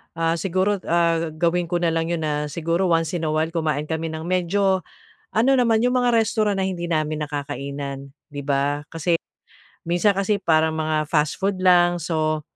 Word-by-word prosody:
ah, 165 0 0
siguro, 190 +2 0
ah, 170 -1 +2
gawin 170 +1 +1
ko 175 - -2
na 170 -1 +1
lang 165 0 -1
'yon 170 -1 -2
na 150 -1 -1
siguro 170 +4 -1
once 165 0 +1
in 160 - -2
a - - 0
while 160 +1 0
kumain 155 -3 -1
kami 160 +1 -3
ng 160 - -6
medyo 185 +2 +1 0.5
ano 255 +5 +3
naman 230 -3 +3
'yong 250 +2 +2
mga 245 -1 +2
restaurant 215 -2 0
na 190 - 0
hindi 175 -2 -4
namin 155 -2 -1
nakakainan, 140 -1 -5 0.2
'di 145 -2 -7
ba? 145 +1 0
Kasi 165 +1 +1 0.7
minsan 175 +4 +2
kasi 200 +1 0
parang 160 -2 +2
mga 155 -1 -1
fast 150 -1 0
food 195 -1 -1
lang. 175 -1 +4
So, 155 -1 -1
165 Hz, 180 wpm, -22 LUFS, 155-185 Hz, 0.7 s, lang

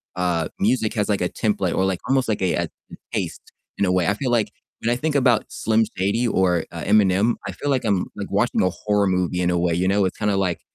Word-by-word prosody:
uh, 90 -3 0
music 110 +1 +1
has 105 -2 0
like 100 - +1
a 90 - 0
template 100 -4 -1
or 95 - +2
like 95 -2 -1
almost 135 -1 +2
like 105 - -1
a 95 - +1
a - - 0 0.3
a - - -8 0.2
taste - - -4 0.3
in - - 0
a 90 - +1
way. 90 -2 +2
I 105 - +3
feel 125 +1 -2
like 115 -3 +2 0.3
when 115 - -1
I 120 - +2
think 150 +4 -1
about 125 -5 +3
Slim 110 0 +1
Shady 100 +6 +1
or, 90 -5 +2
uh, 85 - -6
Eminem, 100 +2 +3
I 100 - -3
feel 145 +10 -4
like 135 -3 +1
I'm 100 -4 +1
like - - -6
watching - - +1
a 90 - +3
horror 105 0 0
movie 90 -1 0
in 90 0 +1
a 90 - +1
way, 85 -1 +1
you 90 +1 0
know? 100 0 +2
It's 95 - -3
kinda 105 -2 0
like 95 -3 -1
100 Hz, 255 wpm, -22 LUFS, 90-110 Hz, 0.3 s, I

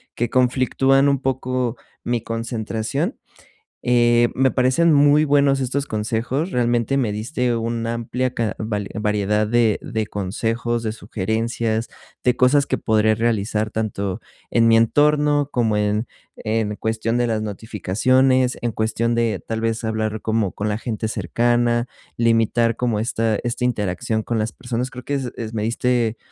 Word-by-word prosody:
que 120 - -1
conflictúan 130 +2 +3
un 140 -1 +1
poco 130 -2 -1 0.3
mi 120 -1 -1
concentración. 115 - -3 0.7
Eh, 120 -1 +4
me 130 +1 +3
parecen 130 +7 +3
muy 145 +1 +5
buenos 140 -1 +3
estos 135 +2 -1
consejos, 115 - -2
realmente 120 -1 +1
me 120 -6 +1
diste 120 +3 -1
una 115 0 -2
amplia 125 +2 -2
ca 115 -2 -2
va 110 -1 -2 0.2
variedad 105 0 +1
de 115 -1 +2
de 110 -1 -3
consejos, 115 +4 -2
de 110 - -2
sugerencias, 110 +2 -2 0.4
de 125 - +3
cosas 140 +3 +4
que - - -1
podré 110 -1 +2
realizar 110 -1 0
tanto 100 -3 -3 0.3
en 115 -1 +3
mi 115 0 +6
entorno 145 +4 +3
como 115 -3 +1
en 105 +2 0 0.3
en 110 -1 -1
cuestión 110 +2 -1
de 120 -1 +1
las 110 -1 -1
notificaciones, 125 +5 +1
en 120 -1 -2
cuestión 115 +2 0
de 115 -5 0
tal 115 0 -3
vez 115 0 -1
hablar 110 -1 -2
como 110 -3 0
con 105 - -3
la 105 0 -1
gente 110 -2 -3
cercana, 120 +1 +1 0.3
limitar 115 0 +2
como 120 -4 -1
esta 110 -1 0
esta 120 +1 -2
interacción 110 -1 -1
con 115 - -1
las 110 +1 -1
personas. 125 0 -4
Creo 125 0 -9
que 145 - -2
es 130 -3 -3
es 115 -1 -6
me 105 - -1
diste 115 0 0
115 Hz, 155 wpm, -21 LUFS, 110-125 Hz, 0.7 s, mi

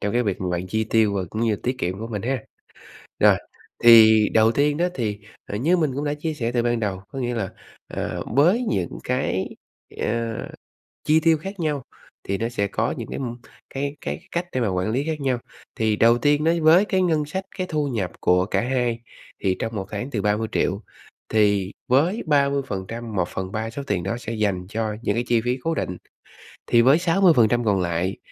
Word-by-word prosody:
trong 100 -1 -1
cái 120 - +2
việc 100 -5 -2
mà 95 - -2
bạn 90 +1 -2
chi 110 +4 -1
tiêu 110 -2 +2
và 95 - 0
cũng 110 - -3
như 110 -3 +2
tiết 125 +5 -3
kiệm 95 -3 -2
của 110 - -5
mình 105 -4 -4
ha. 130 -1 -2 0.8
Rồi, - - +6 0.5
thì 110 -2 +8
đầu 110 0 +5
tiên 145 +3 +1
á, 175 +2 +1
thì, 105 -5 -2 0.3
à, 100 - -4
như 165 +11 +2
mình 155 -5 +1
cũng 145 - -2
đã 145 - 0
chia 155 +2 -3
sẻ 120 -5 -2
từ 120 -1 +1
ban 120 -1 +1
đầu, 100 -4 -2
có 135 - -6
nghĩa 120 -1 -1
là, 100 -5 -2 0.4
ờ, - - -4
với 175 - +4
những 90 -3 -2
cái, 125 -7 -1 0.4
ờ, 115 0 -1 0.7
chi 155 +1 +4
tiêu 165 -1 +3
khác 195 +4 -7
nhau, 150 -4 -1 0.5
thì 100 0 0
nó 115 - -1
sẽ 110 -4 -1
có - - -1
những - - -6
cái, - - -5
ừm, 120 -3 -4 0.3
cái 140 +1 -3
cái 70 +1 -4
cách 175 +1 -2
để 130 - -1
mà 115 - +1
quản 90 +1 -1
lý 130 +5 0
khác 160 -2 -2
nhau. 130 -3 0 0.4
Thì 110 -1 +1
đầu 115 +2 +5
tiên 145 +4 +2
đấy, 165 +1 +2
với 165 +5 +6
cái 190 -3 +1
ngân 160 -4 +2
sách, 190 +6 -4
cái 185 - -1
thu 150 -4 -1
nhập 105 -9 -2
của 90 0 +3
cả - - 0
2 120 -2 0 0.4
thì 95 -1 +1
trong 115 0 -3
1 95 -2 -3
tháng 110 +6 -4
từ 105 -7 -2
30.000.000, 105 -1 0 0.5
thì 100 -3 +2 0.2
với 160 - +2
30%, 125 -7 -1
1/3 95 +5 -2
số 140 +5 -6
tiền 95 -4 -1
đó 95 +6 -2
sẽ 115 -1 -6
dành 100 -5 -1
cho 110 0 -2
những - - 0
cái 120 - -1
chi 120 -1 +3
phí 125 +1 +1
cố 165 0 0
định. 90 - -3 0.7
Thì 120 - +5
với 135 +5 +6
60% 165 - +4
còn 100 -3 +2
lại, 90 +2 -1
115 Hz, 210 wpm, -23 LUFS, 105-145 Hz, 0.8 s, thì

